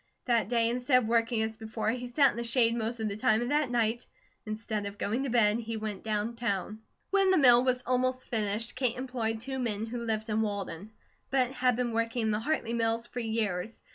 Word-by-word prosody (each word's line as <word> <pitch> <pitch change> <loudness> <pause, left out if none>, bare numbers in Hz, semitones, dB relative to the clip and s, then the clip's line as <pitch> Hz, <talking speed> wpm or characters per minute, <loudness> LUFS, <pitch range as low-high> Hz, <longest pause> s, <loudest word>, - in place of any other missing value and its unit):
That 235 -4 +1
day 230 -2 +2
instead 250 +2 +2
of - - -3
working 230 0 +2
as 220 0 -3
before, 220 0 -2
he 245 +1 -4
sat 275 +3 +4
in - - -10
the 235 - -2
shade 235 -1 +2
most 230 0 -3
of 220 - -1
the 200 - -3
time, 215 +1 +2
and 240 +2 -2
that 295 -2 +2
night 235 -1 0 0.4
instead 215 -1 -3
of 200 0 -8
going 220 +5 -1
to - - -2
bed 225 -2 +3
he 230 -1 -4
went 215 -2 -5
down 220 +1 -2
town. 215 -2 -2 0.3
When 390 -1 +4
the 375 - +4
mill 245 -4 +7
was 250 -1 +1
almost 255 +1 0
finished 220 0 -1
Kate 255 -2 0
employed 245 -4 -2
two 265 +2 -4
men 220 -3 -1
who 235 +1 -5
lived 220 -1 -2
in 215 +1 +1
Walden, 200 -3 -4 0.4
but 260 -2 +1
had 250 -2 +1
been 245 0 -1
working 230 +1 -1
in 220 - +1
the 210 - 0
Hartley 235 -2 -1
mills 230 0 0
for 245 - -6
years. 220 -3 -2
230 Hz, 225 wpm, -29 LUFS, 220-245 Hz, 0.4 s, mill